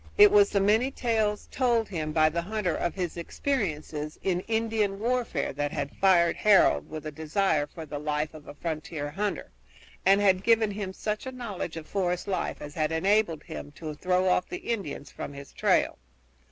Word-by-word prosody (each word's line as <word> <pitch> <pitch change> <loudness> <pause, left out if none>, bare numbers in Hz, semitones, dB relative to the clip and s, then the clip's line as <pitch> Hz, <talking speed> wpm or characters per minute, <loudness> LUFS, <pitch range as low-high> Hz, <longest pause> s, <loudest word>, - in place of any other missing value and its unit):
It 415 0 +9
was 410 -1 +6
the 200 - +1
many 215 +6 +3
tales 220 -5 0
told 240 -4 +2
him 155 -5 -3
by 155 0 +4
the 170 +2 -2
hunter 185 -2 -1
of 175 - -2
his 180 -3 -3
experiences 160 - -3
in 180 -2 +1
Indian 220 -3 0
warfare 235 - -1
that 145 +1 -2
had 140 - -4
fired 175 -3 +4
Harold 185 - +4
with 155 -1 -7
a 155 - -4
desire 155 0 0
for 160 +2 -9
the 145 -1 -5
life 150 +1 -2
of 155 -2 -12
a - - -9
frontier 155 -2 -4
hunter, 205 +5 -3 0.5
and 195 +1 +5
had 190 -2 +4
given 225 0 +3
him 200 -2 -4
such 210 +5 -4
a - - -4
knowledge 210 -10 -5
of 160 - -7
forest 180 -1 -1
life 190 -2 -2
as 145 - -8
had 155 0 0
enabled 170 -2 +2
him 145 - -8
to 155 0 -6
throw 180 +4 +1
off 180 0 +2
the 360 -9 -4
Indians 155 -9 -6
from 145 - -7
his 140 0 -10
trail. - - +2
185 Hz, 190 wpm, -28 LUFS, 155-215 Hz, 0.5 s, It